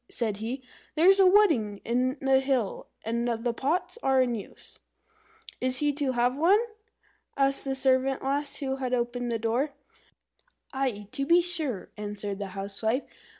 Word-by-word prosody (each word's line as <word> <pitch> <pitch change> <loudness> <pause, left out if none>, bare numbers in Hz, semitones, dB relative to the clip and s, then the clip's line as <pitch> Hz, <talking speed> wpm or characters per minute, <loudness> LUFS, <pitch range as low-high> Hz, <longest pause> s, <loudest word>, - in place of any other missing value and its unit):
said 220 -4 -2
he. 240 +5 -5 0.3
"There's 375 +5 +5
a 380 - +7
wedding 315 - +4
in 255 +4 0
the 270 -1 +4
hill, 265 -6 -1 0.2
and 235 +2 -1
all 230 - 0
the 235 +1 -2
pots 310 - -1
are 265 -1 +3
in 250 -2 +2
use." 215 -4 -9 0.8
"Is 255 0 +1
he 295 +1 +2
to 280 -2 -1
have 245 +3 +1
one?" 360 +6 +5 0.8
asked 275 0 +1
the 270 -1 -1
servant 265 0 +2
lass 280 +1 -1
who 270 -1 -2
had 255 -1 -1
opened 245 0 -2
the 230 - 0
door. 240 +6 -1 1.0
"Aye, 250 -7 -2
to 275 - -1
be 340 +2 +6
sure," 320 - -2
answered 205 -1 -4
the 200 - -3
Housewife. 220 +6 -1
260 Hz, 160 wpm, -27 LUFS, 230-280 Hz, 1.0 s, a